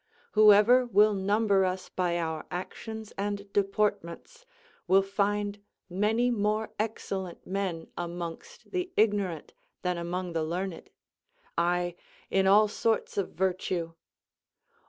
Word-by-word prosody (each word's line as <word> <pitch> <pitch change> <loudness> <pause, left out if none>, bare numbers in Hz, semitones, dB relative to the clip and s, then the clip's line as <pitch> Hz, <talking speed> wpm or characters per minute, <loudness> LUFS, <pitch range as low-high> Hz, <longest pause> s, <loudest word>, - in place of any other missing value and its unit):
Whoever 215 +4 +6
will 210 -1 +5
number 200 0 +2
us 185 0 -2
by 175 -2 0
our 160 -2 -3
actions 220 +4 -6
and 205 0 -1 0.2
deportments 205 - -1 0.4
will 190 +2 +5
find 205 +1 -1 0.3
many 220 +6 +2
more 215 0 0
excellent 195 -4 -4
men 185 -4 -3
amongst 170 -1 -7
the 365 -1 -2
ignorant 200 -7 +1 0.3
than 180 -1 -1
among 175 +1 -3
the 165 -1 0
learned; 175 +2 -4 0.7
aye, 175 +1 +1 0.4
in 190 0 +3
all 210 +2 +6
sorts 220 +2 -1
of 200 -3 -2
virtue. 180 -2 -1
195 Hz, 115 wpm, -29 LUFS, 175-210 Hz, 0.7 s, Whoever